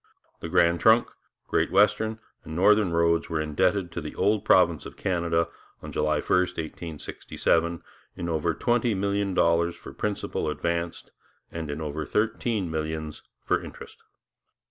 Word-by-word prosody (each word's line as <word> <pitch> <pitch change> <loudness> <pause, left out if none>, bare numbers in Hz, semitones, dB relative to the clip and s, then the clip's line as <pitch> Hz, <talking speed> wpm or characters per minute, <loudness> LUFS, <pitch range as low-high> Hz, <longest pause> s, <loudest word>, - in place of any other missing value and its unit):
The 80 - -6
Grand 85 -1 +3
Trunk, 110 +2 +5 0.4
Great - - +1
Western, 105 +3 +3 0.3
and 80 - -8
Northern 100 +1 +4
roads 85 0 +2
were 80 -2 -1
indebted 85 +4 0
to 85 - -4
the 75 - -7
old 105 0 +1
province - - +3
of - - -13
Canada 85 -3 0 0.4
on - - -7
July 75 0 0
1, - - -16
1867, 85 -1 -1 0.3
in 85 - -4
over 80 0 0
twenty 120 +1 +1
million 100 0 -1
dollars 85 0 +2
for - - -11
principal 100 -6 -2
advanced 85 +2 -3 0.4
and 80 -2 -5
in 75 +2 -4
over 75 0 -3
thirteen 105 0 -1
millions 80 -1 -4 0.2
for - - +1
interest. - - -11
85 Hz, 145 wpm, -26 LUFS, 80-100 Hz, 0.4 s, Trunk